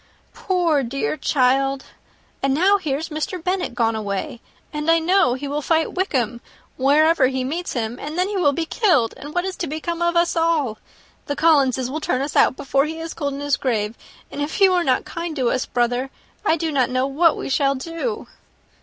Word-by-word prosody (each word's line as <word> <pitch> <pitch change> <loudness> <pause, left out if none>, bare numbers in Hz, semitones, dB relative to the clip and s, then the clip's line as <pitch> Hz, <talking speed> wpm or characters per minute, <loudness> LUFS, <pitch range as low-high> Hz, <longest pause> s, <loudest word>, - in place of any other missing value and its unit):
Poor, 345 -6 +1
dear 275 +4 -2
child! 270 -1 +1 0.6
And 275 0 +1
now 390 +6 +4
here's 310 -2 -3
Mr. 310 +5 -3
Bennet 365 -8 -1
gone 225 -2 +1
away, 205 +2 -4 0.3
and 300 +1 -2
I 330 - +6
know 330 -6 +3
he 280 +2 -5
will 290 +2 -2
fight 320 +2 +1
Wickham, 245 - -1 0.3
wherever 295 +2 +4
he 260 0 -2
meets 330 +7 -3
him, 235 0 -3
and 300 +3 -6
then 365 +1 +2
he 415 - -4
will 330 -7 +3
be 325 +3 -2
killed, 325 - +2
and 295 +3 -10
what 355 +1 +1
is 380 -1 -3
to 340 - -3
become 325 +3 -4
of 345 0 +1
us 340 0 +2
all? 320 -9 +1 0.5
The 285 - -2
Collinses 265 -6 +3
will 310 +2 -4
turn 255 - 0
us 285 - -5
out, - - +4
before 275 0 +1
he 320 +1 -5
is 325 0 -5
cold 285 -3 -3
in 280 - -6
his 285 -1 +1
grave; 220 -4 -1 0.4
and 290 - -5
if 295 +8 -3
you 385 -2 +6
are 355 -1 +2
not 260 -5 +1
kind 335 -2 -5
to 255 -5 +1
us, 255 - -1
brother, 245 +2 0 0.3
I 330 -5 +2
do 320 0 -2
not 265 -4 +1
know 255 +1 0
what 310 +4 +3
we - - -5
shall 275 0 +2
do." 330 - -4
290 Hz, 205 wpm, -21 LUFS, 260-335 Hz, 0.6 s, I